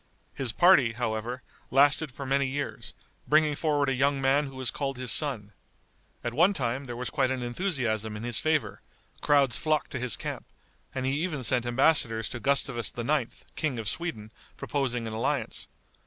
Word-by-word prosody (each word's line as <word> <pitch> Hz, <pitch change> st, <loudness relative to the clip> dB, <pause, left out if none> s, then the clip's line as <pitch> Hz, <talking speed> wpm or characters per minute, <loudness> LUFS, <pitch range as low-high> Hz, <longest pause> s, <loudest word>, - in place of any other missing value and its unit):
His 130 Hz, -4 st, -1 dB
party, 140 Hz, -, +5 dB
however, 120 Hz, +1 st, -3 dB, 0.3 s
lasted 140 Hz, +2 st, +4 dB
for 140 Hz, +2 st, -7 dB
many 135 Hz, +1 st, +1 dB
years, 140 Hz, +2 st, -5 dB, 0.3 s
bringing 150 Hz, 0 st, +3 dB
forward 145 Hz, -2 st, +1 dB
a 135 Hz, -, +1 dB
young 140 Hz, +2 st, +1 dB
man 135 Hz, +2 st, +2 dB
who 135 Hz, -, -10 dB
was 130 Hz, -2 st, -2 dB
called 135 Hz, -2 st, -3 dB
his 125 Hz, -2 st, -1 dB
son. 110 Hz, -8 st, +1 dB, 0.7 s
At 120 Hz, 0 st, -3 dB
one 175 Hz, +9 st, +4 dB
time 130 Hz, -3 st, -2 dB
there 120 Hz, -2 st, -6 dB
was 125 Hz, 0 st, -4 dB
quite 135 Hz, -4 st, +1 dB
an 130 Hz, -1 st, -2 dB
enthusiasm 120 Hz, -, -2 dB
in 110 Hz, -, -7 dB
his 120 Hz, -2 st, +1 dB
favor, 155 Hz, -10 st, 0 dB, 0.4 s
crowds 140 Hz, -4 st, +3 dB
flocked 155 Hz, -1 st, 0 dB
to 130 Hz, -, -3 dB
his 125 Hz, -2 st, -2 dB
camp, -, -, -6 dB, 0.5 s
and 130 Hz, -1 st, -2 dB
he 135 Hz, +3 st, 0 dB
even 155 Hz, -8 st, -3 dB
sent 120 Hz, +1 st, +1 dB
embassadors 120 Hz, -3 st, +3 dB
to 120 Hz, -, -6 dB
Gustavus 130 Hz, -5 st, +1 dB
IX., 125 Hz, +1 st, -1 dB
King 150 Hz, -6 st, -1 dB
of 110 Hz, -2 st, -4 dB
Sweden, 110 Hz, -, -4 dB, 0.3 s
proposing 125 Hz, -5 st, -2 dB
an 110 Hz, -, -5 dB
alliance. 115 Hz, +2 st, -2 dB
130 Hz, 175 wpm, -28 LUFS, 120-145 Hz, 0.7 s, party